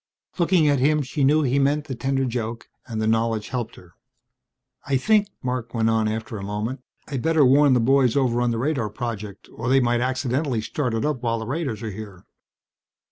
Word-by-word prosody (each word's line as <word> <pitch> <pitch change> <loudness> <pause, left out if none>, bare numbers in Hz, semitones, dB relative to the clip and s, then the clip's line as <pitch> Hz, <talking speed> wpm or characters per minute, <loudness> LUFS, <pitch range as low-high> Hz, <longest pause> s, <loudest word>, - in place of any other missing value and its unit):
Looking 170 -2 +3
at 145 -2 +3
him 150 +3 +2
she 140 +2 -2
knew 150 +3 +4
he 135 +1 +1
meant 145 +2 +1
the 135 - -5
tender 135 +1 -1
joke 115 -2 -4 0.2
and 115 -3 -4
the 110 - 0
knowledge 110 -1 0
helped 120 -3 -4
her. 85 -1 -17 0.9
"I 135 -1 +2
think," 210 +8 +3 0.2
Marc 125 -2 -3
went 115 0 +2
on 110 -1 +1
after 110 +1 -4
a - - -7
moment, 105 +6 -4 0.3
"I'd 135 -4 -3
better 160 -1 +3
warn 140 +2 +5
the - - +3
boys 130 0 +3
over 120 -3 +2
on 120 - +2
the 115 - -1
radar 125 -3 -1
project 105 -2 -6
or 120 +2 -4
they 135 +1 +5
might 120 -1 +1
accidentally 130 0 -1
start 115 +2 -2
it 115 - -1
up 150 -5 -1
while 115 -1 0
the 110 - -5
raiders 130 -5 -3
are 110 - -3
here." 100 -3 -10
125 Hz, 205 wpm, -23 LUFS, 115-140 Hz, 0.9 s, warn